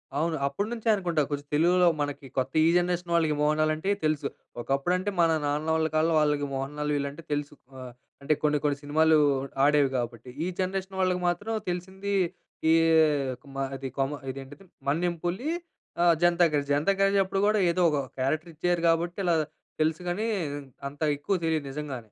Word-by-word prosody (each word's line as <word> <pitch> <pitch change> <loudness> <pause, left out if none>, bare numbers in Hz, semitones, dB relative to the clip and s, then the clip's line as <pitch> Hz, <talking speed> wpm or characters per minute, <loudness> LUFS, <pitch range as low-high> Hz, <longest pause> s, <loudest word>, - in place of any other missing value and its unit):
అవును. 160 +2 0
అప్పటినుంచే 220 +10 -2
అనుకుంటా 175 -5 0
కొంచెం 145 -1 -4
తెలుగులో 175 +3 +4
మనకి 145 -1 -3
కొత్త 130 +1 -1
ఈ - - +5
జనరేషన్ 175 -1 -1
వాళ్ళకి 160 -3 +2
'మోహన్ 150 +1 +2
లాల్' 155 0 +2
అంటే 160 +6 -3 0.2
తెలుసు. 155 -2 0 0.3
ఒకప్పుడంటే 175 +10 0
మన 165 - +4
నాన్న 150 +2 -1
వాళ్ళ 160 0 +1
కాలంలో 160 +1 +3
వాళ్ళకి 150 -1 +1
'మోహన్ 135 +2 -4
లాల్' 150 0 -1
వీళ్ళంటే 140 +3 -4
తెలుసు. 145 0 -2 0.3
ఆహ్, 130 -1 -8 0.3
అంటే 145 +2 +2
కొన్ని 150 -1 +3
కొన్ని 145 -1 +1
సినిమాలు 155 +2 +4 0.5
ఆడేవి 145 -1 +4
కాబట్టి. 120 0 -5 0.2
ఈ - - -1
జనరేషన్ 190 0 -2
వాళ్ళకి 180 -1 +1
మాత్రం 205 +5 -3 0.2
తెలిసింది 190 +3 -4 0.6
ఈ - - +6 0.8
మా 135 - -1
అది 135 0 -5
కొమ్మ 135 +2 0 0.2
ఇదేంటిది 135 +6 -10 0.2
'మన్యం 170 +4 0
పులి' 195 - -1 0.5
ఆహ్, 175 -1 +6
'జనతా 175 0 +5
గ్యారేజ్'. 145 -1 0
'జనతా 150 +7 +2
గ్యారేజ్' 195 0 +4
అప్పుడు 195 +1 -1
కూడా 215 0 +3
ఏదో 180 - 0
ఒక 145 - +1 0.2
క్యారెక్టర్ 155 +6 -1
ఇచ్చారు 175 +1 0
కాబట్టి, 170 +1 0
ఇలా 170 -2 +3 0.5
తెలుసు 160 +2 +1
కానీ 210 +6 -1 0.6
అంత 145 +2 -18 0.2
ఎక్కువ 150 +8 -2
తెలియదు 160 -3 0
నిజంగా. 145 -2 -5
160 Hz, 170 wpm, -27 LUFS, 145-180 Hz, 0.8 s, ఈ